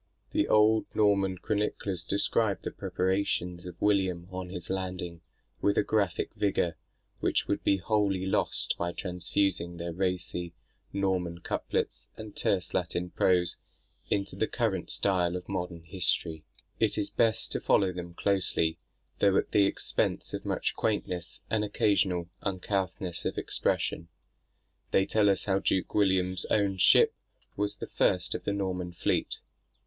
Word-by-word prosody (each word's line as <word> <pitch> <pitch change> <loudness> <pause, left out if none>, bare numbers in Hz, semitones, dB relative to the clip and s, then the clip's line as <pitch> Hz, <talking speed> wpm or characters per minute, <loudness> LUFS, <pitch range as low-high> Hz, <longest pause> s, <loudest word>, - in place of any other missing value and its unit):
The - - +2
old 110 +1 +4
Norman 100 -3 +3
chroniclers 100 -3 -2
describe 100 +2 +1
the - - -3
preparations 90 -2 -1
of 90 -1 -9
William 95 -4 +1
on 90 -1 -5
his 90 -1 -6
landing, 90 -3 -3 0.4
with 100 - +2
a - - +5
graphic 100 -6 0
vigour, 95 -5 +1 0.4
which - - +1
would - - -1
be 100 - +3
wholly 100 -1 +1
lost 95 - 0
by 85 0 -1
transfusing 90 -1 -1
their 85 0 -4
racy 90 -1 -2 0.4
Norman 90 -3 -1
couplets - - -2
and 110 -2 -8
terse 95 -3 0
Latin 90 0 -1
prose 90 -2 +2 0.5
into 100 -1 -1
the 110 - 0
current 110 -7 -1
style 90 -3 +1
of 90 0 -5
modern 90 -3 -4
history. 85 -2 -1 0.3
It - - +2
is 105 - -1
best 115 -1 +2
to - - 0
follow 95 -2 +3
them 85 -1 -7
closely, 85 -5 +1 0.4
though 100 -1 +4
at - - 0
the 100 - +5
expense - - -1
of - - -4
much - - 0
quaintness 90 -5 -2
and 110 -1 +2
occasional 95 -4 +1
uncouthness 95 -2 -2
of - - -2
expression. 85 - -1 0.8
They 95 - +3
tell 105 -1 +3
us 95 - +1
how 95 -1 +2
Duke 95 -1 0
William's 95 -2 +2
own 100 -2 +2
ship - - +6 0.4
was 105 0 -1
the - - -6
first - - +1
of - - -5
the 100 - 0
Norman 90 -3 -2
fleet. 90 - -1
95 Hz, 145 wpm, -29 LUFS, 90-100 Hz, 0.8 s, ship